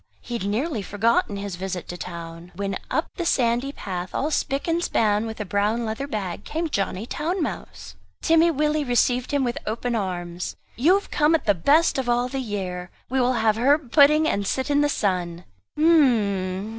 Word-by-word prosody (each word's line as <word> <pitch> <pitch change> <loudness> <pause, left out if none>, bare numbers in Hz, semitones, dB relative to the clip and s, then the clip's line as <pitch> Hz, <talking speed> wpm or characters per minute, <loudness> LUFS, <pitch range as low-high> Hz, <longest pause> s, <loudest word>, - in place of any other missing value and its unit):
He 245 - -9
had 195 - -4
nearly 230 +4 -1
forgotten 205 +1 +1
his 200 -2 -5
visit 185 -1 -4
to 175 - -4
town. 170 0 -8
When 195 +1 -2
up - - 0
the 350 - -1
sandy 245 -3 +1
path 185 -8 -6
all 300 +3 0
spick 275 0 -1
and 335 +1 +1
span 215 -4 +1
with 220 0 -7
a 210 - -3
brown 210 +4 0
leather 220 +6 -3
bag 200 -6 -4
came 325 +6 -3
Johnny 195 -1 -1
Town 330 +9 -2
mouse! - - -6 0.2
Timmy 330 +1 +4
Willie 300 0 +1
received 245 -1 +1
him 285 -2 +1
with 240 -1 -2
open 235 +3 -2
arms. 180 -4 -3 0.2
"You 320 +10 +4
have 400 - -3
come 300 +2 +3
at 325 - -2
the 205 - +4
best 285 - +3
of 255 -2 -2
all 245 +1 +1
the 270 - -3
year, 185 -6 -4 0.2
we 265 0 +2
will 250 +1 +2
have 220 -2 +2
herb 275 +1 +2
pudding 305 +1 +6
and 200 -8 0
sit 265 +6 -1
in 290 0 +3
the 290 - +2
sun." 180 -7 -1 0.3
"H'm'm! 215 - +2
230 Hz, 195 wpm, -24 LUFS, 195-285 Hz, 0.3 s, pudding